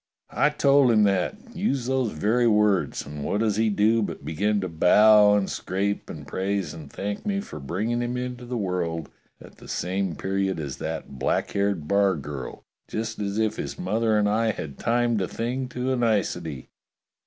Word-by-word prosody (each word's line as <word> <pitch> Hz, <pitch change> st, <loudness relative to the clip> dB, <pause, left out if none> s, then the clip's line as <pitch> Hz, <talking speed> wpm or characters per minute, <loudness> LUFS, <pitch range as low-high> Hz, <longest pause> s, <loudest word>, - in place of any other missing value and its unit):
I 150 Hz, -, +3 dB
told 140 Hz, -3 st, +4 dB
him 110 Hz, -2 st, +5 dB
that, 100 Hz, -, +1 dB, 0.2 s
used 140 Hz, -, -1 dB
those 130 Hz, -4 st, +1 dB
very 110 Hz, +10 st, +2 dB
words, 105 Hz, -8 st, +2 dB
and 75 Hz, 0 st, -7 dB
what 105 Hz, -, -1 dB
does 105 Hz, -2 st, +1 dB
he 110 Hz, 0 st, +3 dB
do 105 Hz, +3 st, +3 dB
but 105 Hz, -, -4 dB
begin 105 Hz, +6 st, 0 dB
to 95 Hz, -, -2 dB
bow 105 Hz, +5 st, +6 dB
and 100 Hz, -1 st, 0 dB
scrape 100 Hz, +2 st, -2 dB
and 75 Hz, -2 st, -8 dB
praise 95 Hz, +5 st, -2 dB
and 80 Hz, -4 st, -10 dB
thank 100 Hz, +1 st, -4 dB
me 200 Hz, -2 st, -1 dB
for 200 Hz, -, -7 dB
bringing 105 Hz, -, -2 dB
him 120 Hz, +1 st, -2 dB
into 125 Hz, 0 st, -5 dB
the 125 Hz, 0 st, -3 dB
world 85 Hz, -6 st, -2 dB, 0.3 s
at -, -, -15 dB
the -, -, -14 dB
same 95 Hz, 0 st, -2 dB
period 95 Hz, 0 st, -1 dB
as 70 Hz, -4 st, -5 dB
that 80 Hz, -4 st, -5 dB
black -, -, 0 dB
haired 100 Hz, -6 st, -1 dB
bargirl, 80 Hz, -9 st, -1 dB, 0.2 s
just 115 Hz, +1 st, -4 dB
as 100 Hz, 0 st, -2 dB
if 110 Hz, -1 st, 0 dB
his -, -, -5 dB
mother 110 Hz, +3 st, +1 dB
and 105 Hz, -1 st, +3 dB
I 110 Hz, +2 st, +2 dB
had 70 Hz, -7 st, -7 dB
timed 120 Hz, -1 st, +1 dB
the 95 Hz, -, -1 dB
thing 125 Hz, +3 st, -3 dB
to 125 Hz, +1 st, -2 dB
a -, -, +1 dB
nicety! 90 Hz, -, -1 dB
105 Hz, 185 wpm, -25 LUFS, 90-115 Hz, 0.3 s, bow